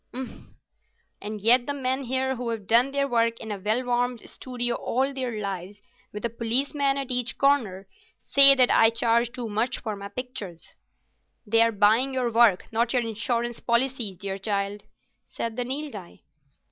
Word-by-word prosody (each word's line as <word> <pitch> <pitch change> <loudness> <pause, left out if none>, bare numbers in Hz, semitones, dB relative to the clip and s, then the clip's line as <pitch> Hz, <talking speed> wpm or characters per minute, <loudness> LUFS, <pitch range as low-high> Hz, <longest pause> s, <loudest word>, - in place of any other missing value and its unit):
"Umph! 260 -1 -8 0.7
And 210 +1 -6
yet 240 +3 +4
the 285 - -2
men 265 0 -2
here 265 +1 -1
who've 230 -4 -4
done 235 +6 +4
their 280 0 -1
work 230 -2 0
in 220 - -7
a 205 - -4
well 215 +6 0
warmed 245 -1 -1
studio 245 -2 -2
all 265 +4 -1
their 250 -5 -4
lives, 195 0 -6 0.3
with 210 +2 -6
a - - 0
policeman 275 +5 0
at 275 -2 -4
each 250 -1 -1
corner, 220 -10 +1 0.3
say 275 0 +7
that 255 -2 +4
I 225 - +5
charge 235 +1 +1
too 245 -2 -5
much 220 +4 -1
for 215 -2 -5
my 200 0 -8
pictures." 235 -8 -8 0.7
"They 225 +2 +4
are 230 0 +4
buying 225 +6 +2
your 250 -2 -1
work, 230 -5 +4
not 235 +2 0
your 250 -2 +1
insurance 235 +1 -2
policies, 235 -5 -1
dear 195 +1 -5
child," 200 0 -2 0.5
said 230 -1 -5
the 250 - -2
Nilghai. 260 - -7
235 Hz, 170 wpm, -25 LUFS, 215-255 Hz, 0.7 s, say